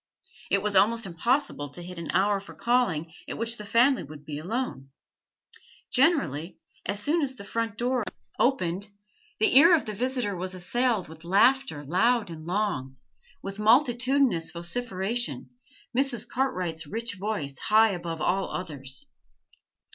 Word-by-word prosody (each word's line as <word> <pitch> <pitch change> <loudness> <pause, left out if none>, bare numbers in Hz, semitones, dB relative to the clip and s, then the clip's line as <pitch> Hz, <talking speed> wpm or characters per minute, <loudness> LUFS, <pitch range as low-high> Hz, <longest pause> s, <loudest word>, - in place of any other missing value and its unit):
It 195 0 +2
was 210 -1 -1
almost 230 +4 +4
impossible 190 - -1
to 175 +5 -10
hit 180 0 -8
an 165 - -6
hour 200 +1 +2
for 200 - -13
calling 185 -10 0 0.2
at - - -4
which 230 +1 +1
the 210 - -7
family 245 +6 +4
would 145 0 -11
be 150 -1 -5
alone; 180 - -4 1.0
generally, 250 - +2 0.3
as 200 +1 -1
soon 310 +10 +1
as 265 -3 0
the 200 - -9
front 225 +1 -3
door 245 0 0 0.4
opened, 200 -7 +1 0.5
the 220 - +3
ear 335 +6 +9
of 315 - -1
the 215 - -4
visitor 245 -2 -1
was 185 +1 -3
assailed 225 +3 0
with 160 0 -13
laughter 200 - +3
loud 220 - +2
and 160 0 -9
long, 175 -10 -2 0.5
with 195 +1 -6
multitudinous 245 - +3
vociferation, 195 +8 -2 0.4
Mrs. 255 -4 +2
Cartwright's 180 - -2
rich 230 +5 -4
voice 185 -10 -3
high 220 +1 +4
above 170 -3 -5
all 190 +4 0
others. 135 -7 -5
205 Hz, 145 wpm, -27 LUFS, 170-245 Hz, 1.0 s, ear